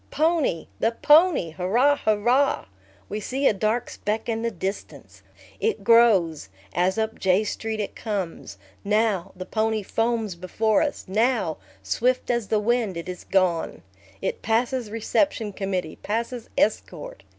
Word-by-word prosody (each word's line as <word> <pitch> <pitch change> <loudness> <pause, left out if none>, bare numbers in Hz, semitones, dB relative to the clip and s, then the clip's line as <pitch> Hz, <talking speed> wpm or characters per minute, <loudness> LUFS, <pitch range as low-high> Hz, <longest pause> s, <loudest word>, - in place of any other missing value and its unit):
Pony! 310 - +1
The 225 - +1
pony, 295 - +4
hurrah, 225 - +2
hurrah! 240 +4 +2 0.4
We 210 - -4
see 265 +6 -2
a - - +4
dark 220 +4 0
speck 215 +1 -3
in 225 -1 -1
the 230 - 0
distance. 195 -1 -6 0.4
It 445 -1 -1
grows, 195 - +4 0.2
as 185 +3 +1
up 220 0 -2
J 190 +2 +3
Street 220 +1 -4
it 205 - -4
comes. 190 - -4 0.3
Now, 210 -3 +1
the 185 0 -7
pony 220 +1 0
foams 225 -1 -1
before 200 +5 0
us; 295 -2 -2
now, 215 -4 +1 0.3
swift 245 - 0
as 235 -3 -1
the 215 - +1
wind, 220 -4 0
it 170 - -6
is 180 -1 -6
gone. 185 -4 0 0.4
It 480 -2 -2
passes 235 +1 0
reception 225 0 0
committee, 185 -5 -3
passes 230 +2 -4
escort. - - -1
220 Hz, 140 wpm, -24 LUFS, 190-240 Hz, 0.4 s, pony